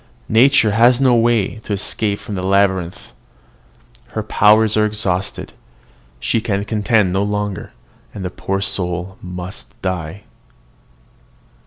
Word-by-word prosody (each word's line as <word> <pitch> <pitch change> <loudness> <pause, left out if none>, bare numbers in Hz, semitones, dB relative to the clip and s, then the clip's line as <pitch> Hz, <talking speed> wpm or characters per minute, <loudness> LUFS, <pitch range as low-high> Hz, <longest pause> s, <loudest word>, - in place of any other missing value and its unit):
Nature 115 -1 +4
has 120 +4 +4
no 130 -2 +4
way 115 -3 +2
to 110 - -5
escape 100 +1 -1
from 105 - -8
the 95 - -3
labyrinth: 95 -2 0 1.0
her - - -1
powers 105 +1 +4
are 110 0 +3
exhausted: 95 -4 -3 0.7
she 115 - 0
can 100 -2 -2
contend 105 -3 +1
no 95 - +1
longer, 105 -1 -3 0.4
and 95 - -7
the 90 - -3
poor 95 0 -3
soul 90 -1 -2
must 90 0 -8
die. 95 +1 -4
100 Hz, 125 wpm, -18 LUFS, 95-110 Hz, 1.0 s, Nature